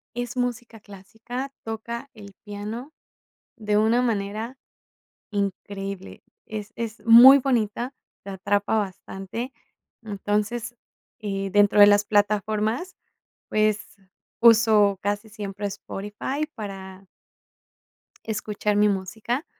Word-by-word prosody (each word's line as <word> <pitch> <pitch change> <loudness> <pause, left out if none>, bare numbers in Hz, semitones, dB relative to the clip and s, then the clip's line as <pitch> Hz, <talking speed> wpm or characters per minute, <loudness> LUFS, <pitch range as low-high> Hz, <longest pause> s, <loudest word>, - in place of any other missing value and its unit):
Es 245 +1 -4
música 240 -2 -3
clásica, 225 +7 -8
toca 235 +4 -6
el 200 -2 -12
piano 215 +8 -7 0.6
de 210 -2 0
una 225 +3 +3
manera 220 +2 -2 0.7
increíble. 195 -1 -4 0.2
Es 215 +1 -7
es 230 -1 -5
muy 245 +4 +10
bonita, 245 0 -1 0.3
te 200 - -7
atrapa 200 +3 0
bastante. 200 +4 -5 0.5
Entonces, 210 +3 -2 0.4
eh, 195 -2 -3
dentro 205 0 +4
de 205 - +10
las 205 0 +5
plataformas, 215 - 0 0.5
pues, 215 -1 0 0.4
uso 220 -3 +6
casi 205 +2 -2
siempre 205 -1 -5
Spotify 210 +9 -4
para. 195 -3 -8 1.2
Escuchar 210 -1 -2
mi 210 0 +4
música, 215 - -3
210 Hz, 100 wpm, -24 LUFS, 200-230 Hz, 1.2 s, muy